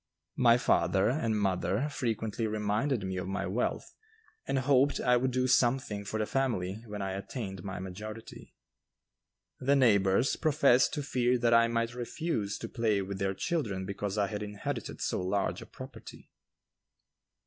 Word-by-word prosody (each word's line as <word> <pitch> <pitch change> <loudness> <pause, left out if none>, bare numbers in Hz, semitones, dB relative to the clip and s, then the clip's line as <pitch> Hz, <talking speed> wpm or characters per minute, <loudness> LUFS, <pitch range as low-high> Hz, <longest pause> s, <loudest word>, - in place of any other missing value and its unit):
My 120 -1 +6
father 95 -1 +2
and 115 -6 0
mother 100 +6 0
frequently 115 -5 -2
reminded 110 +3 0
me 95 0 -3
of 90 0 -3
my 95 +1 -2
wealth 105 +7 -2 0.5
and - - 0
hoped 135 +1 +3
I 125 - +3
would 130 +2 +2
do 130 0 0
something 125 -4 +2
for 110 - -3
the 110 - 0
family 110 -6 -1
when 105 -1 -5
I 95 - -2
attained 95 -1 -5
my 95 -2 -5
majority. 105 +5 -8 1.0
The 140 +2 +3
neighbors 105 -2 +3
professed 140 -5 +4
to 145 - -2
fear 125 -3 +1
that 120 -1 +2
I 115 0 +6
might 115 0 -1
refuse 120 -3 -3
to - - -6
play 110 -4 0
with 95 0 -5
their 95 0 -1
children 105 - -2
because 100 +1 -4
I 105 - +3
had 105 0 -4
inherited 105 -1 -5
so - - -1
large 95 +2 -1
a - - -10
property. 130 -3 -11
110 Hz, 160 wpm, -30 LUFS, 100-125 Hz, 1.0 s, My